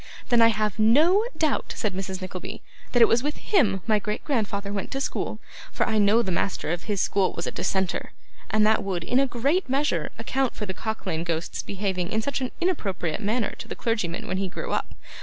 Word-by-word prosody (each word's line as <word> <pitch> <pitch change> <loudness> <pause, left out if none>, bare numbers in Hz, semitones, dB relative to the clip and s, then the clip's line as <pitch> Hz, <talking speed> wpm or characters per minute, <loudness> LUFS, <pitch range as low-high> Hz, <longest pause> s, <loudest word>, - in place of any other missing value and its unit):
'Then 240 -1 +5
I 230 - +8
have 215 -2 0
no 310 - +5
doubt,' 310 -4 0
said 210 -3 -1
Mrs. 190 0 -4
Nickleby, 185 -1 -6 0.3
'that 245 -2 +6
it - - +7
was 235 - +3
with 295 +2 -2
him 215 - +2
my 215 -2 +3
great 210 +2 -3
grandfather 205 -7 -1
went 200 - -3
to 270 - -3
school; - - -2 0.3
for - - 0
I 220 -2 +2
know 210 +3 +5
the 190 - -2
master 180 -2 -1
of 175 0 -3
his 205 -3 -1
school 195 0 +2
was 170 - -4
a - - -2
dissenter, 190 -2 -1 0.4
and 215 -1 +3
that 220 +1 +4
would, 185 -4 -2
in 250 +9 +2
a 275 - +3
great 275 +8 +1
measure, 280 +3 +1
account 265 -2 -1
for 210 - -3
the 190 - -4
Cock 220 +3 -4
lane 165 -3 -1
Ghost's 165 -1 -2
behaving 190 -2 -2
in 220 0 0
such 280 +2 -2
an 255 - -1
improper 195 - 0
manner 220 +2 0
to - - -7
the - - -5
clergyman 205 -7 -1
when 185 - -1
he 195 -1 -1
grew - - -5
up. - - -2
215 Hz, 220 wpm, -25 LUFS, 190-245 Hz, 0.4 s, I